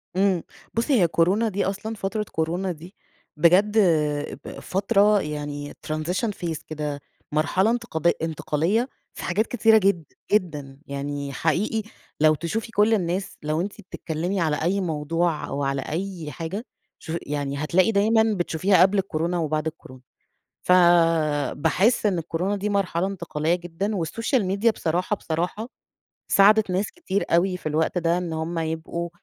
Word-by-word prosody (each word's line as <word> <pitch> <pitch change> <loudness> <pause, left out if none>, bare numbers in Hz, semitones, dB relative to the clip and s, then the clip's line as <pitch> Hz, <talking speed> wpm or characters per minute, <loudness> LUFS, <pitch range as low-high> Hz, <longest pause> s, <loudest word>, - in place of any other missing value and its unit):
إمم. 190 -3 +2 0.3
بُصّي، 230 +5 +1
هي 175 - +5
كورونا 185 +7 +2
دي 200 0 -1
أصلًا 205 +3 -3
فترة 210 +1 -2
كورونا 175 +4 -1
دي، 170 +4 -11 0.4
بجد 185 +7 +4 0.7
ب - - -8
فترة 200 +1 +3
يعني 145 -1 -5
transition 165 +8 -1
phase 165 -3 -3
كده، 150 -2 -4 0.3
مرحلة 155 +7 +2
انتقاد 170 -8 0
انتقالية 165 - 0 0.2
في - - -8
حاجات 210 +6 0
كتيرة 225 -2 +4
جد 195 -5 +2 0.3
جدًا، 150 -9 -1
يعني 140 0 -4
حقيقي 190 +10 0 0.4
لو 155 0 +5
تشوفي 215 +9 -3
كل 215 +1 +3
الناس، 185 -1 -1
لو 155 +2 0
أنتِ 205 +3 -5
بتتكلّمي 175 +1 -3
على 155 -3 0
أي 190 +4 +1
موضوع 165 0 -1
أو 140 - -3
على 135 -1 0
أي 170 -1 -4
حاجة 185 +8 -5 0.3
شوفي 170 +1 -4
يعني 140 -1 -3
هتلاقي 185 +7 +3
دايمًا 220 +2 +4
بتشوفيها 180 +2 +2
قبل 195 +2 +5
الكورونا 175 -2 -1
وبعد 155 -1 -1
الكورونا. 130 -5 -9 0.6
فباحِس 170 - +3
إن 190 -4 +1
الكورونا 175 +5 -2
دي 200 +1 -2
مرحلة 190 -3 0
انتقالية 170 -4 -1
جدًا 175 +4 -3
والسوشيال 225 - 0
ميديا 200 +5 +2
بصراحة، 180 +2 -1
بصراحة 180 +7 -3 0.6
ساعدت 210 +1 +5
ناس 190 +3 -1
كتير 260 - -2
أوي 180 +2 +3
في 155 - -4
الوقت 160 +4 0
ده، 170 0 +2
إن 175 -2 -3
هم 160 +1 -3
يبقوا 160 +1 -3
175 Hz, 145 wpm, -24 LUFS, 160-200 Hz, 0.7 s, هي